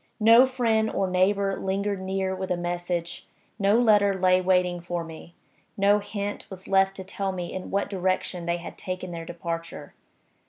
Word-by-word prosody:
No 230 +4 +7
friend 225 -4 +1
or 195 - -1
neighbor 195 +2 +2
lingered 195 +1 -2
near 190 0 -2
with 190 0 -5
a 180 - 0
message; 175 0 -3 0.3
no 200 +2 +4
letter 205 -4 +4
lay 185 0 +3
waiting 180 -1 +1
for 175 0 -3
me; 165 +1 -11 0.4
no 200 +1 +4
hint 205 0 -5
was 190 -1 -10
left 195 0 +3
to 190 - -7
tell 195 +1 -3
me 180 -2 -5
in 185 - -6
what 200 +1 0
direction 185 -2 -2
they 170 0 +1
had 175 - -9
taken 185 -1 -5
their 165 -1 -6
departure. 165 0 -6
190 Hz, 170 wpm, -26 LUFS, 175-200 Hz, 0.4 s, No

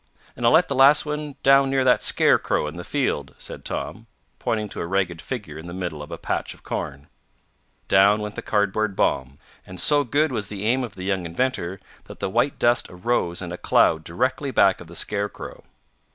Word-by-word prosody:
"And 120 - 0
I'll - - +5
let 175 - +5
the - - -2
last 140 +3 +6
one 150 -1 -4
down 135 0 +5
near 135 -1 +2
that 125 -1 +4
scarecrow - - +2
in 75 +1 -6
the 90 - -6
field," 75 - -2
said - - -8
Tom, - - -5 0.3
pointing 110 -2 -1
to - - -6
a 85 - -3
ragged 90 -3 -1
figure 100 - -6
in 80 - -9
the 85 - -7
middle 85 -5 -4
of 75 - -9
a - - -6
patch - - -3
of - - -22
corn. 70 +1 -5 0.8
Down 100 +2 +5
went 105 0 -5
the - - -6
cardboard 105 0 0
bomb, 65 -4 0 0.3
and 90 -1 -9
so 145 -1 +4
good 145 +4 +1
was 110 -5 -3
the 100 0 -5
aim 125 +4 +2
of 115 -5 -7
the 95 - -7
young 95 -1 -1
inventor 95 -1 -2 0.3
that - - -12
the 95 - -2
white 120 +6 +1
dust 120 0 +2
arose 90 -2 -1
in 85 - -6
a 90 - -6
cloud 80 -1 +3
directly 130 - -1
back 95 -8 +3
of 85 - -11
the 85 - -11
scarecrow. 100 +3 -4
105 Hz, 210 wpm, -23 LUFS, 90-130 Hz, 0.8 s, last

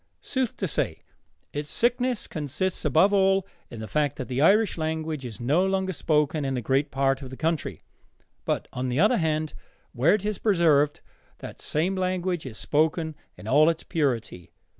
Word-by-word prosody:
Sooth 260 -3 -2
to 190 - -1
say, 85 - -2 0.5
its 145 +1 -3
sickness 245 0 +1
consists 160 +5 -2
above 185 +8 +4
all 195 -1 +3 0.2
in 115 - -9
the 110 - -6
fact 145 +6 0
that 130 - -5
the 130 +2 -1
Irish 205 +6 +4
language 160 -2 -3
is 110 - -9
no 145 +9 +2
longer 190 0 0
spoken 150 -2 +1
in 135 -1 -1
a - - 0
great 135 +5 +1
part 135 0 +1
of 135 - -7
the 130 - -9
country. 160 -1 -2 0.6
But, - - -2
on 130 0 -2
the 125 +3 -1
other 215 +7 +4
hand, 155 -3 -1 0.4
where 140 +10 +4
it 205 -1 -4
is 210 -2 -2
preserved, 160 -8 +3 0.4
that - - -9
same 170 +6 0
language 185 -4 -1
is 110 -4 -8
spoken 160 +1 0 0.2
in - - -10
all 150 +4 +5
its 165 -1 -2
purity. 115 - -2
155 Hz, 180 wpm, -26 LUFS, 135-185 Hz, 0.6 s, all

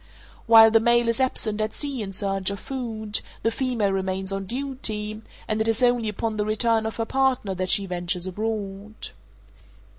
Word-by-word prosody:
While 225 -1 +8
the 225 - +5
male 235 +1 +3
is 230 +3 0
absent 220 -4 +1
at 215 0 -2
sea 280 -5 -3
in 195 -2 -5
search 195 0 0
of 200 0 -5
food, 225 -5 -2 0.2
the 225 - +2
female 230 -5 0
remains 190 0 -2
on 195 -1 -4
duty, 220 -4 -3 0.3
and 215 0 -1
it 220 - +1
is 225 +2 +2
only 245 -3 +3
upon 215 +1 -3
the 210 - +1
return 220 +1 +1
of 220 - -5
her 225 - -2
partner 260 -5 0
that 185 0 -3
she 200 - +4
ventures 180 0 -1
abroad. 205 +1 -4
215 Hz, 180 wpm, -24 LUFS, 195-230 Hz, 0.3 s, While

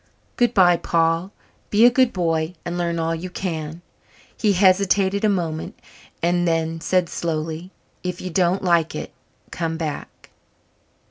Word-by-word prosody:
"Good 240 -1 +2
bye, 175 -3 +6
Paul. 165 +2 +1 0.4
Be 215 +3 +5
a 245 - +7
good 255 -1 +3
boy 165 -1 -1
and 175 - -3
learn 170 -1 -1
all 165 0 0
you 170 +3 -5
can." 165 -3 -5 0.5
He 210 -2 +2
hesitated 195 +1 +3
a 215 - +4
moment 165 -5 -2 0.5
and 175 +1 +2
then 165 0 -1
said 180 +1 +1
slowly, 165 +1 -3 0.3
"If 180 -1 -4
you 185 - -5
don't 180 +2 +1
like 170 -3 +2
it, - - -6 0.4
come 165 -1 -3
back." 155 -3 -6
175 Hz, 145 wpm, -22 LUFS, 165-185 Hz, 0.5 s, a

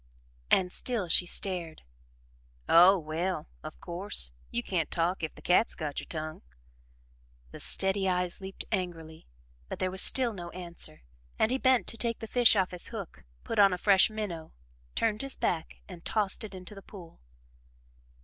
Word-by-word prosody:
And 180 -1 +3
still 230 -5 0
she 175 +2 +5
stared. 175 -4 -3 0.8
"Oh, 180 +4 +7
well, 170 +3 -3 0.2
of 65 - -9
course, 170 - 0 0.2
you 120 - -2
can't 170 -5 -1
talk, 175 +3 -1
if 160 - -4
the - - -15
cat's 180 +6 +3
got 150 -3 -4
your - - -9
tongue." 155 -1 -6 1.1
The - - -10
steady 195 0 +1
eyes 180 0 -1
leaped 190 0 -6
angrily, 165 -5 -4 0.4
but - - -5
there 185 0 -1
was 190 +1 +1
still 250 -3 +5
no 175 -3 -7
answer, 175 - -8 0.3
and 220 - +2
he 260 - 0
bent 260 -2 +3
to 230 - -4
take 230 -1 -1
the - - -7
fish 240 0 +5
off 190 -2 +1
his 180 -1 -1
hook, 205 - -8 0.2
put 225 - -2
on 200 -2 +6
a - - -2
fresh 195 +1 +5
minnow, 205 -7 -6 0.4
turned 215 -2 0
his 275 -1 -3
back 165 -2 -2
and 175 -3 -11
tossed 210 -1 -1
it 205 -3 -8
into 185 +3 -10
the 195 - -11
pool. 180 -5 -13
185 Hz, 170 wpm, -29 LUFS, 170-210 Hz, 1.1 s, Oh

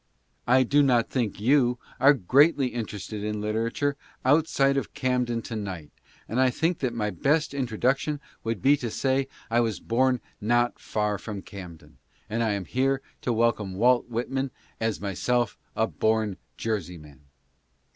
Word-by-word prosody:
I 130 +1 +5
do 145 +4 +3
not 125 -4 +3
think 120 -7 -1
you 125 +1 +3 0.2
are 140 +3 +7
greatly 135 - +4
interested 105 -2 -5
in 105 0 -2
literature 115 +7 -1 0.3
outside 140 -1 +3
of 135 - -3
Camden 125 -4 0
to 115 - -6
night, 95 -8 -5 0.4
and 125 +3 0
I 130 - +5
think 160 +7 0
that 125 -3 -1
my 105 -2 -1
best 150 - +1
introduction 135 +3 0 0.2
would 115 -4 -3
be 140 +2 +6
to 120 -4 -4
say 135 +4 +1
that - - -29 0.2
I 120 - +4
was 115 -3 0
born 125 +2 +1 0.2
not 120 +3 +1
far 105 -2 -1
from 100 -3 -6
Camden, 90 -5 -11 0.3
and 115 +2 0
I 110 -2 +1
am 100 -2 -3
here 135 +4 0 0.2
to 125 - -1
welcome 110 -4 +1
Walt 120 +4 +3
Whitman 130 +3 -2 0.3
as 115 -2 -1
myself 120 +5 0 0.2
a 110 - +2
born 110 -3 0 0.2
Jerseyman. 85 - -4
120 Hz, 155 wpm, -26 LUFS, 105-130 Hz, 0.4 s, are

